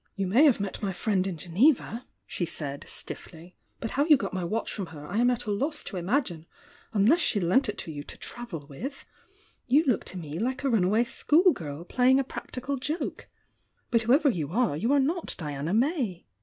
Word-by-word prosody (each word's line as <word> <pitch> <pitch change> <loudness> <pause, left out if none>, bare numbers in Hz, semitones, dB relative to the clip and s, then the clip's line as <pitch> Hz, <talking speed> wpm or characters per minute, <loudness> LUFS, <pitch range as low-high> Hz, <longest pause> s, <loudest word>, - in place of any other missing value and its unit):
"You 195 - -1
may 230 +12 +5
have 275 -8 +5
met 200 -1 -4
my 195 -2 -1
friend 190 0 0
in 180 -4 -4
Geneva," 230 - +1 0.2
she - - -3
said, 140 -4 -2
stiffly. 170 +2 -5 0.2
"But 225 - -4
how 285 +2 +2
you 305 -3 +7
got 195 -5 -4
my 185 -1 -2
watch 215 +7 -2
from 195 -4 -4
her, 150 -3 -10
I 180 +7 -4
am 245 +2 +4
at 245 -1 -1
a 210 - -2
loss 285 +9 -1
to 195 - -6
imagine 175 - -1 0.2
— - - -26
unless 225 - +4
she 225 -10 +2
lent 200 +9 +2
it 210 - -4
to 160 - -5
you 145 -1 -6
to - - -9
travel 195 -12 -6
with. 260 - -7 0.6
You 280 +5 +5
look 250 -7 +2
to 185 - -6
me 160 -1 -5
hke 255 +5 -2
a 275 - +1
run 220 -6 +3
away 215 +5 +3
schoolgirl 235 - +1
playing 255 +7 +3
a - - +2
practical 260 +1 -5
joke. 300 +6 -3 0.6
But 230 - +4
whoever 260 +7 +4
you 160 - -2
are, 230 -6 +1
you 225 - 0
are 285 - +5
not 325 +6 0
Diana 150 0 -4
May." 235 - 0
220 Hz, 210 wpm, -27 LUFS, 175-265 Hz, 0.6 s, you